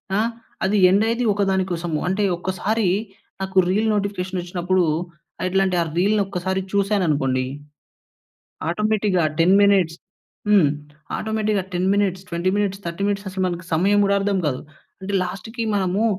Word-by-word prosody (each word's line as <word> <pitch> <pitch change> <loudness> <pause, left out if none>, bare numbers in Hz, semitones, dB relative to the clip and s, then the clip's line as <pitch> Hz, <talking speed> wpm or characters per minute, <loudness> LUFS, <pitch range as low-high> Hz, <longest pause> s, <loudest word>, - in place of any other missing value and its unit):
ఆ! - - +2 0.5
అది 205 +2 +2
ఎండయ్యేది 225 +5 +2
ఒకదాని 195 -2 +1
కోసము. 170 -2 -2
అంటే, 195 +3 0
ఒక్కసారీ 190 +3 -1 0.5
నాకు 190 0 -4
రీల్ 215 +4 +1
నోటిఫికేషనొచ్చినప్పుడూ, 185 -2 -1 0.6
ఎట్లా 195 +1 +2
అంటే 180 -2 0
ఆ - - +2
రీల్‌నొక్కసారి 190 -1 0
చూశాననుకోండి, 165 -11 +1 1.3
ఆటోమేటిక్‌గా 210 -1 +1 0.2
10 180 +4 +5
మినిట్స్, 190 -5 +3 0.5
హ్మ్, 195 -8 +5 0.5
ఆటోమేటిక్‌గా 215 -2 -1
10 180 +2 0
మినిట్స్, 195 -2 0
20 170 +2 0
మినిట్స్, 200 -1 -1
30 170 +3 -3
మినిట్స్ 200 -1 -2
అసలు 185 0 -2
మనకు 175 -1 -4
సమయం 200 +5 +3
కూడా 200 0 +2
అర్థం 195 -1 0
కాదు. 130 -3 -2 0.4
అంటే, 200 +1 -4
లాస్ట్‌కీ 200 +6 -5
మనమూ 195 +3 +1
190 Hz, 130 wpm, -22 LUFS, 180-205 Hz, 1.3 s, 10